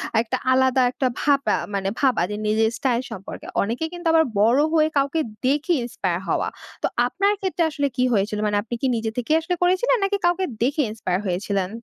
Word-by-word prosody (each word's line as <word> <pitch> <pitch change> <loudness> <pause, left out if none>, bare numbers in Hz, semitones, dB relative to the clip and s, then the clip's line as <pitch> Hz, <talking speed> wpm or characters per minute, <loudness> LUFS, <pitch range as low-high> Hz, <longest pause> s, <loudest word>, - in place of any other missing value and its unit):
আ - - +4
একটা 255 +3 -2
আলাদা 260 0 +3
একটা 260 0 0
ভাবা 280 -2 +2 0.2
মানে 195 -1 -1
ভাবা 260 -9 +2
যে - - -2
নিজের 220 +1 +2
স্টাইল 250 -2 0
সম্পর্কে। 190 - -8
অনেকে 235 +10 -2
কিন্তু 345 -1 -4
আবার 325 0 +5 0.2
বড় 235 +6 +4
হয়ে 310 -1 +4
কাউকে 280 +4 +1 0.3
দেখে 295 +6 +2
ইন্সপায়ার 185 -7 -2
হওয়া। - - 0 0.4
তো - - +3 0.2
আপনার 400 +2 +1
ক্ষেত্রে 370 -3 0
আসলে 285 -2 -1
কি 250 - +2
হয়েছিল 210 +1 0
মানে, 205 0 +1
আপনি 235 +1 -5
কি 265 - +1
নিজে 225 -1 -2
থেকেই 245 +6 +1
আসলে 355 +2 -2
করেছিলেন 375 +8 +3
নাকি 400 +1 +1
কাউকে 355 +2 +2 0.2
দেখে 290 +4 +1
ইন্সপায়ার 185 -4 -2
হয়েছিলেন? 190 +1 -1
260 Hz, 195 wpm, -23 LUFS, 215-320 Hz, 0.4 s, আবার